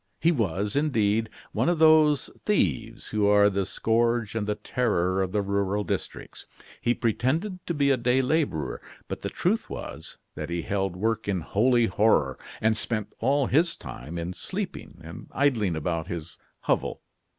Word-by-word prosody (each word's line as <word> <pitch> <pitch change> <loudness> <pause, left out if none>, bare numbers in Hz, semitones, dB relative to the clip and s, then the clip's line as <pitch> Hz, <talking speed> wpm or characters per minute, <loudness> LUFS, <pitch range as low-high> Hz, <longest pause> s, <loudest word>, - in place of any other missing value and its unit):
He 165 - +4
was, 105 - -1
indeed, 115 -7 +1 0.2
one - - +1
of 175 - +1
those 155 -2 +5
thieves 95 - 0
who 105 -1 +1
are 105 0 +5
the 95 -1 -1
scourge 115 0 +1
and 110 -2 -2
the 105 - 0
terror 95 -8 0
of 95 -1 -1
the 105 0 0
rural 100 +1 0
districts. - - -5 0.3
He 120 - +2
pretended 160 - -1
to 170 - -1
be 140 -1 +3
a 135 - +3
day 125 +2 +2
laborer, 125 - 0 0.3
but - - -5
the - - -3
truth - - 0
was, - - -7 0.2
that 75 +1 -6
he 85 -1 -2
held 95 -2 -1
work 110 +3 -1
in 95 -3 0
holy 120 +7 +3
horror, 105 -12 +2 0.2
and 110 0 +3
spent 110 -1 -3
all 135 +3 +2
his 165 +6 +2
time 75 +6 -8
in 85 +2 -3
sleeping 185 - -5
and 80 +1 -9
idling 115 - +2
about 80 +1 -2
his 85 -2 -6 0.2
hovel. - - -1
110 Hz, 165 wpm, -26 LUFS, 95-130 Hz, 0.3 s, those